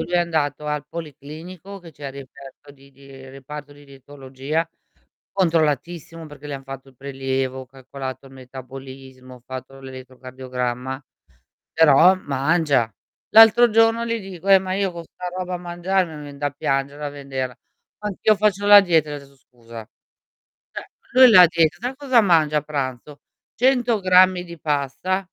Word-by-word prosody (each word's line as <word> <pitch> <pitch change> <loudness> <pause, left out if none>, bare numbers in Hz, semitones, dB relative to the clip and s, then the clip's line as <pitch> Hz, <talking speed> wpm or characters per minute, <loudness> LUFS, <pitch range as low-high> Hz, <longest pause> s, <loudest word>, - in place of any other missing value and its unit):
lui - - -5
è 175 - +3
andato 150 -4 -1
al 150 -1 -3
policlinico 165 +5 -10
che 170 -3 -14
c'è 145 0 -9
il - - -10
reperto 140 +1 -13
di 140 0 -20
di 140 0 -19 0.2
reparto 145 +2 -10
di 145 0 -17
dietologia, 140 +3 -5 0.6
controllatissimo 165 -2 -1
perché 150 -1 -12
le 145 - -4
han 135 - -10
fatto 135 0 -10
il 130 - -24
prelievo, 130 -1 -4
calcolato 130 0 -8
il 135 - -15
metabolismo, 130 0 -12
fatto 130 +1 -9
l'elettrocardiogramma, 130 0 -6 0.7
però 160 +4 +6
mangia. 140 - 0 0.4
L'altro 225 +2 +8
giorno 225 +1 +3
gli 230 0 -2
dico: 190 -2 -10
"Eh, 195 -1 +8
ma 185 0 -4
io 195 -1 -1
con 170 -1 -8
'sta 180 +2 -9
roba 180 -1 -4
mangiare 175 +2 -1
me 155 -3 -10
vien 140 -1 -11
da 145 0 -1
piangere 140 +1 -3
a - - -3
vederla." 135 -3 -5 0.4
"Anch'io 210 +1 +1
faccio 205 -1 0
la 205 0 +9
dieta" 160 -5 +1
Gli - - -4
ho 145 - -6
detto: 140 0 -18
"Scusa." 115 -4 -13 0.9
Cioè, - - -7 0.3
lui 255 -1 +8
da 180 -4 +9
dieta 160 -3 +1
sai 245 +3 -4
cosa 260 -4 +2
mangia 160 -7 +3
a 150 - 0
pranzo? 140 -1 -5 0.3
100 245 -3 +1
grammi 185 -1 +4
di 170 -2 -11
pasta, 150 +6 -1
145 Hz, 155 wpm, -21 LUFS, 135-180 Hz, 0.9 s, la